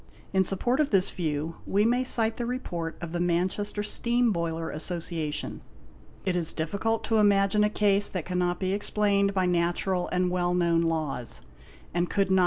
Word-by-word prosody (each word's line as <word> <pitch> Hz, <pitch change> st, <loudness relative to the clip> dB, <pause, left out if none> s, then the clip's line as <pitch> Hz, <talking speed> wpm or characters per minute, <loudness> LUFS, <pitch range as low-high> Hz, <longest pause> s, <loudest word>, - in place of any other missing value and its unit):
In 190 Hz, 0 st, +4 dB
support 240 Hz, -, +1 dB
of 300 Hz, -2 st, +2 dB
this 195 Hz, -2 st, +3 dB
view, 160 Hz, -1 st, -3 dB
we 205 Hz, +2 st, +2 dB
may 245 Hz, +2 st, +2 dB
cite 225 Hz, -3 st, +1 dB
the 240 Hz, -, -2 dB
report 175 Hz, -10 st, -4 dB
of 170 Hz, -2 st, -5 dB
the 175 Hz, -, -2 dB
Manchester 185 Hz, +4 st, 0 dB
Steam 235 Hz, +2 st, +1 dB
Boiler 165 Hz, -2 st, -2 dB
Association,—" 165 Hz, -1 st, -3 dB, 0.6 s
It 185 Hz, -2 st, +1 dB
is 170 Hz, -2 st, +1 dB
difficult 200 Hz, +8 st, -1 dB
to 225 Hz, -, +1 dB
imagine 205 Hz, 0 st, +4 dB
a 210 Hz, -, +3 dB
case 205 Hz, -1 st, +2 dB
that 185 Hz, -5 st, -4 dB
cannot 180 Hz, -1 st, -1 dB
be 185 Hz, 0 st, 0 dB
explained 200 Hz, -1 st, +1 dB
by 185 Hz, -1 st, +2 dB
natural 175 Hz, +1 st, 0 dB
and 180 Hz, 0 st, 0 dB
well 180 Hz, 0 st, +1 dB
known 170 Hz, -2 st, +2 dB
laws, 155 Hz, -7 st, -2 dB, 0.5 s
and 175 Hz, +1 st, 0 dB
could 195 Hz, -2 st, +1 dB
not. 190 Hz, -, +5 dB
185 Hz, 175 wpm, -27 LUFS, 170-205 Hz, 0.6 s, not